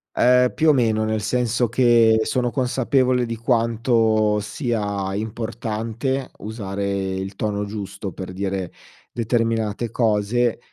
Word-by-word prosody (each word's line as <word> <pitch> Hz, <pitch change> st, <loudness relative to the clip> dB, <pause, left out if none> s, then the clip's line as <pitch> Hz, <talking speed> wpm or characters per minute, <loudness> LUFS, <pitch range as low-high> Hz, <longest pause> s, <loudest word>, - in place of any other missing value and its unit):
Ehm, 125 Hz, 0 st, +4 dB
più 160 Hz, 0 st, +3 dB
o -, -, +7 dB
meno, 110 Hz, -4 st, +2 dB
nel 110 Hz, -1 st, -1 dB
senso 120 Hz, +2 st, 0 dB
che 115 Hz, -2 st, +4 dB
sono 125 Hz, 0 st, 0 dB
consapevole 130 Hz, 0 st, +1 dB
di 115 Hz, -, -3 dB
quanto 115 Hz, -2 st, +2 dB
sia 105 Hz, -4 st, -2 dB
importante 115 Hz, +4 st, -3 dB
usare 100 Hz, -2 st, -3 dB
il 95 Hz, +1 st, -5 dB
tono 105 Hz, -1 st, -2 dB
giusto 100 Hz, -1 st, -6 dB
per 95 Hz, +2 st, -7 dB
dire 95 Hz, -2 st, -3 dB, 0.4 s
determinate 115 Hz, -1 st, -1 dB
cose. 115 Hz, +1 st, +1 dB
110 Hz, 115 wpm, -22 LUFS, 105-120 Hz, 0.4 s, o